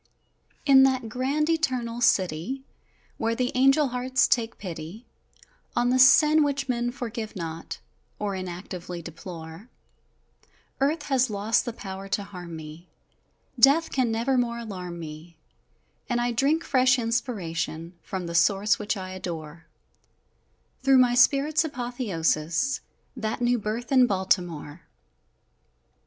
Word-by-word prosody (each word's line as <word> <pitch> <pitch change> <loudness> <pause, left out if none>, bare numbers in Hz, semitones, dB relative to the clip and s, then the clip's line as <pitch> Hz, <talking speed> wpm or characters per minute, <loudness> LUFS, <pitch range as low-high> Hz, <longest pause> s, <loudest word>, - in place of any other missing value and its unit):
In 270 -2 +7
that 260 -3 +2
grand, 270 +6 0
Eternal 255 -8 -1
City, 190 +5 +1 0.6
Where 225 0 0
the 250 +1 -1
angel 270 +2 +4
hearts 255 +2 +1
take 230 -1 0
pity 175 +4 -8 0.7
On 245 +1 +2
the 255 - +2
sin 300 +4 +7
which 280 -1 -1
men 240 -1 0
forgive 230 -3 -6
not, 165 -2 -6 0.4
Or 205 -1 -2
inactively 180 -1 -6
deplore, 165 +5 -9 1.1
Earth 290 +3 +1
has 260 -3 +1
lost 210 +2 0
the 240 - -3
power 195 -2 -7
to 200 +1 -1
harm 180 -4 -9
me! 160 +2 -10 0.7
Death 285 +7 +5
can 255 -4 +1
never 240 +4 +1
more 235 -1 -1
alarm 185 -7 -6
me, 160 +1 -9 0.7
And 240 -1 +1
I 240 0 0
drink 280 +8 +1
fresh 255 -1 +3
inspiration 180 -9 -3
From 185 -2 -5
the 170 - -5
Source 200 +4 +3
which 210 0 -2
I 185 -1 -6
adore 165 -3 -7 1.1
Through 270 0 +5
my 250 -1 +5
Spirit's 280 +5 +4
apothéosis 240 - -1 0.4
That 220 +1 -3
new 245 0 +2
birth 220 +4 -4
in 255 -2 +6
Baltimore! 175 -5 -1
230 Hz, 125 wpm, -26 LUFS, 180-255 Hz, 1.1 s, In